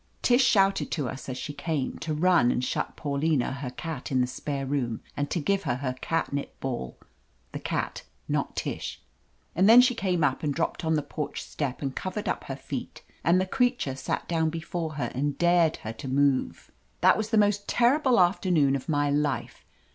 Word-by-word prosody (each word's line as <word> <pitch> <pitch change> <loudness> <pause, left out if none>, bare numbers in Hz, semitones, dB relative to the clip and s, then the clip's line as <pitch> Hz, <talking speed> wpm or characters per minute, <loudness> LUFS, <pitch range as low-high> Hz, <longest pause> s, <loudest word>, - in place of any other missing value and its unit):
Tish 245 +2 +5
shouted 195 -6 +3
to 145 -6 -1
us, 135 +3 -7
as 130 - -4
she 145 - -5
came, 150 -3 -3
to 160 - -4
run 160 -4 +4
and 125 - 0
shut - - -2
Paulina, 145 -2 0
her 130 -1 -4
cat, 150 +1 -6
in 130 - +2
the 125 - +3
spare 135 +2 -4
room, 130 -5 -2
and 145 0 -2
to 175 - -1
give 195 +6 +1
her 140 -9 -1
her 130 0 -2
catnip 145 -4 -2
ball 120 - -4 0.5
(the - - -5
cat, - - -3 0.3
not - - -1
Tish). - - -4 0.6
And 190 +4 +4
then 235 +2 +10
she 250 0 +5
came 185 -7 0
up 135 -2 +1
and 145 -3 -1
dropped 165 - -2
on 160 0 +2
the 150 - 0
porch 145 +1 -5
step 140 -2 -4
and 135 -1 -3
covered 195 +3 -4
up - - -2
her - - -4
feet, - - -7 0.2
and 175 +2 +4
the 185 - +1
creature 245 - 0
sat 130 - -3
down 160 -2 +1
before 165 0 -4
her 150 - -2
and 140 +2 -1
dared 175 -2 +3
her 110 - -3
to 115 - -8
move. 135 0 +1 0.3
That - - +6
was 215 0 -2
the 225 - +2
most 205 -1 +2
terrible 255 0 +3
afternoon 175 -6 +3
of 135 +4 -5
my 145 -1 +2
life. 145 -1 -1
155 Hz, 200 wpm, -27 LUFS, 135-185 Hz, 0.6 s, then